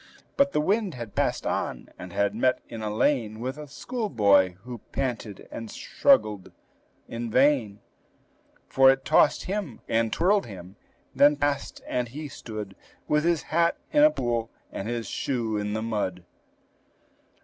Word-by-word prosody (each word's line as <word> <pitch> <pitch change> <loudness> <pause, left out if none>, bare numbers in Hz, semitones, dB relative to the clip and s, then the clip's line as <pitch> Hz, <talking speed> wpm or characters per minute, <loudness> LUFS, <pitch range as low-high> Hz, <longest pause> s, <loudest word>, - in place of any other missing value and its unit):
But 280 0 +3
the 150 - +1
wind 200 - 0
had 115 -4 -7
passed - - 0
on, - - -3
and 90 - -9
had 100 +3 +1
met 125 +3 +1
in 115 - -7
a 105 -1 -2
lane 110 -1 +1
With 130 +4 -4
a 150 - -8
schoolboy, 105 - +2
who 125 -1 -7
panted 120 -6 -4
and 115 -1 -7
struggled 105 - +2 0.6
in 115 0 -5
vain, 125 -5 +2 0.9
For 135 0 +6
it 135 0 +2
tossed - - +4
him, 190 - -4
and 115 0 +1
twirled 195 +1 +2
him, 95 -2 -10 0.4
then 145 +1 +5
passed, 145 -1 -2
and 125 -1 -1
he 145 +5 -7
stood 105 -6 -7 0.3
With 150 0 +2
his 170 -2 +1
hat 170 +1 +3
in 295 - +4
a 305 - +8
pool, 120 - -2 0.2
and 100 - -5
his 120 -1 -3
shoe 115 -5 -2
in 105 0 -2
the 110 0 -2
mud. 105 -5 -2
120 Hz, 155 wpm, -26 LUFS, 105-150 Hz, 0.9 s, a